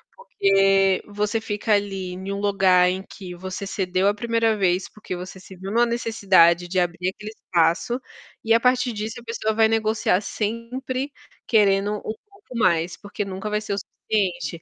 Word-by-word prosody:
porque 195 - +2
você 210 +2 -1
fica 210 0 -1
ali 195 -3 -1
em 190 +2 -6
um 200 - -3
lugar 190 -3 +4
em 190 +1 -3
que 180 -4 -10
você 185 +2 -6
cedeu 185 -1 0
a 205 - +4
1ª 230 0 +1
vez, 185 -2 +1
porque 210 -3 -7
você 185 +1 -8
se 190 +1 -13
viu 190 +2 -7
numa 235 +2 +4
necessidade 195 -7 +3
de 185 +1 +1
abrir 180 +1 0
aquele 210 +2 -8
espaço, 175 +8 +1 0.4
e 225 0 +3
a 230 - +5
partir 250 0 +2
disso, 220 +3 -5
a - - -14
pessoa 220 -1 -2
vai 220 0 +4
negociar 220 -3 +1
sempre 250 +6 -3 0.3
querendo 205 -1 +3
um - - -10 0.3
pouco 395 - -11
mais, 170 -5 +2
porque 205 0 -5
nunca 195 +2 -5
vai 210 0 0
ser 215 -1 -4
o 200 - -2
suficiente. 175 -7 -2
205 Hz, 175 wpm, -23 LUFS, 185-225 Hz, 0.4 s, a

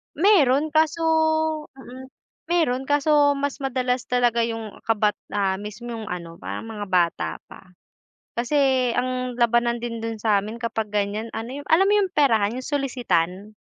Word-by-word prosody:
Meron 305 -5 +4
kaso 315 +1 +2 0.7
mm. 260 0 -11 0.4
Meron 270 -7 +1
kaso 290 0 +3
mas 280 0 -3
madalas 255 -2 -1
talaga 245 -2 +2
yung 225 -2 -6
kabat 210 -2 +1 0.2
ah, 190 -2 0
mismo 210 +4 -7
yung 225 -2 -6
ano, 170 -3 -7
parang - - -6
mga 215 -2 -6
bata 175 -2 +1 0.2
pa. 185 -1 -16 0.6
Kasi 260 0 +2
ang 255 -1 -2
labanan 235 0 +2
din 230 -1 -5
dun 225 -1 -4
sa'min 215 +1 0
kapag 225 -2 -3
ganyan 210 +2 -2
ano, 235 +4 -5
yung - - -18
alam 370 +5 +5
mo 410 - +3
yung 380 - -3
perahan, 230 - +2
yung 255 - -7
solisitan? 215 - -1
240 Hz, 150 wpm, -23 LUFS, 215-275 Hz, 0.7 s, alam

